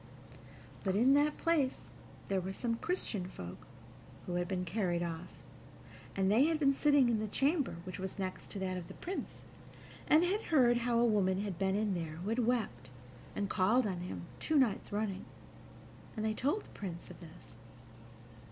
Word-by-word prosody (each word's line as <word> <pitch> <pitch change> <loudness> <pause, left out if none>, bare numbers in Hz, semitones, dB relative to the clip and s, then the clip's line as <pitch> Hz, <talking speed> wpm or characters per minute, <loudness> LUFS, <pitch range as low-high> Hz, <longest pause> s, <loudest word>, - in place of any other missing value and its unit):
But 190 -1 +1
in 245 +6 +5
that 295 +1 +3
place 305 -6 0 0.3
there 195 -1 0
were 190 +2 -4
some 235 +3 -1
Christian 225 - -2
folk 90 - -9 0.6
who 180 - -4
had 175 0 0
been 185 -2 -2
carried 175 -2 0
off, 170 +1 -4 0.9
and 195 0 +2
they 240 +7 +6
had 325 0 +2
been 280 -2 +4
sitting 285 -2 +4
in 230 -2 +2
the 215 - -2
chamber 280 - +1
which 185 +1 -7
was 190 +1 -5
next 190 -2 -4
to - - -4
that 185 -1 -1
of 175 -2 -6
the - - -10
Prince, 375 +2 -6 0.6
and 310 +3 +6
had 395 +5 0
heard 245 -6 +5
how 240 0 +1
a 235 - +5
woman 195 -4 +2
had 200 -4 -4
been 190 0 +1
in 210 -1 +1
there 165 -3 -3
who 175 +6 -5
had 230 +2 0
wept 195 - -1 0.5
and 200 - -1
called 220 +7 +3
on 185 -4 -2
him 180 0 -5 0.2
two 315 - +1
nights 235 -8 +2
running, 205 -2 -2 0.9
and 215 - -1
they 220 - +1
told 285 - 0
the - - -17
Prince 175 -4 -7
of - - -12
this. 170 0 -13
205 Hz, 185 wpm, -34 LUFS, 185-255 Hz, 0.9 s, they